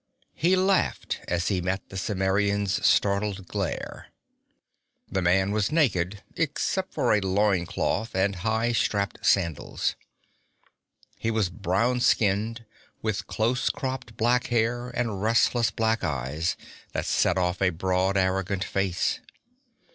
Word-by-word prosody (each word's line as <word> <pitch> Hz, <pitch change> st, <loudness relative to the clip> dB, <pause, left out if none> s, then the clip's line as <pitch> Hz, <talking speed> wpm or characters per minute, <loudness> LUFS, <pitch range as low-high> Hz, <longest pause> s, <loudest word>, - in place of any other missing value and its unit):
He 175 Hz, +6 st, +2 dB
laughed 190 Hz, 0 st, +1 dB
as 85 Hz, 0 st, 0 dB
he 95 Hz, -3 st, 0 dB
met 95 Hz, +2 st, -3 dB
the -, -, -10 dB
Cimmerian's 100 Hz, +1 st, 0 dB
startled 100 Hz, -1 st, +2 dB
glare. -, -, -4 dB, 1.0 s
This 95 Hz, -, -1 dB
man 95 Hz, +3 st, +3 dB
was 105 Hz, -1 st, 0 dB
naked 105 Hz, -, +1 dB
except -, -, -1 dB
for -, -, +2 dB
a 105 Hz, -, +4 dB
loin 95 Hz, -2 st, +1 dB
cloth 110 Hz, +5 st, -2 dB
and 95 Hz, +1 st, +1 dB
high 110 Hz, +5 st, 0 dB
strapped 100 Hz, -3 st, -1 dB
sandals. 85 Hz, -6 st, +1 dB, 1.2 s
He 115 Hz, -, -1 dB
was 110 Hz, -5 st, 0 dB
brown 100 Hz, +6 st, 0 dB
skinned, 115 Hz, 0 st, +1 dB, 0.4 s
with 110 Hz, -2 st, -2 dB
close 120 Hz, +3 st, 0 dB
cropped 130 Hz, -5 st, -4 dB
black 120 Hz, +2 st, +2 dB
hair 120 Hz, +1 st, 0 dB
and 115 Hz, -5 st, -2 dB
restless 115 Hz, +2 st, +3 dB
black 115 Hz, -1 st, 0 dB
eyes 75 Hz, +2 st, -1 dB, 0.4 s
that -, -, -2 dB
set 90 Hz, -, +2 dB
off 90 Hz, 0 st, 0 dB
a 95 Hz, -, +4 dB
broad, 95 Hz, +2 st, 0 dB
arrogant 95 Hz, 0 st, 0 dB
face. 95 Hz, -4 st, -1 dB
100 Hz, 125 wpm, -26 LUFS, 95-115 Hz, 1.2 s, a